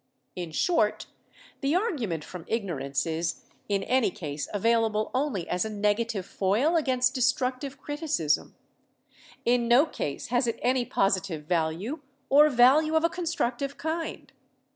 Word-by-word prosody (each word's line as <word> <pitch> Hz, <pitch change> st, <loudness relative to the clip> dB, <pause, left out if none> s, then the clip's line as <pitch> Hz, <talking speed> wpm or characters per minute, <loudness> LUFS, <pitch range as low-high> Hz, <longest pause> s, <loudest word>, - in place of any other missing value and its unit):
"In 175 Hz, -2 st, -5 dB
short, 215 Hz, -, +1 dB, 0.5 s
the 280 Hz, +3 st, 0 dB
argument 250 Hz, -, -1 dB
from 180 Hz, 0 st, -9 dB
ignorance 150 Hz, -, -2 dB
is 165 Hz, 0 st, -2 dB, 0.3 s
in 200 Hz, -1 st, +1 dB
any 255 Hz, -1 st, +2 dB
case 150 Hz, -5 st, -5 dB
available 220 Hz, 0 st, +1 dB
only 255 Hz, -, -1 dB
as 180 Hz, -, 0 dB
a 220 Hz, -, -3 dB
negative 210 Hz, -1 st, 0 dB
foil 215 Hz, -, +1 dB
against 255 Hz, -5 st, +2 dB
destructive 260 Hz, +1 st, 0 dB
criti 290 Hz, +3 st, -6 dB
cism. 155 Hz, -, +1 dB, 0.9 s
In 240 Hz, 0 st, +2 dB
no 245 Hz, +6 st, +6 dB
case 150 Hz, -, -5 dB
has 245 Hz, +1 st, +1 dB
it 230 Hz, -, -1 dB
any 250 Hz, 0 st, +2 dB
positive 195 Hz, -7 st, 0 dB
value 170 Hz, -, -1 dB, 0.3 s
or 295 Hz, +2 st, +7 dB
value 285 Hz, +5 st, +5 dB
of 320 Hz, -, +3 dB
a 335 Hz, -, +4 dB
constructive 300 Hz, -6 st, -2 dB
kind. 320 Hz, +1 st, -4 dB
235 Hz, 140 wpm, -27 LUFS, 185-275 Hz, 0.9 s, or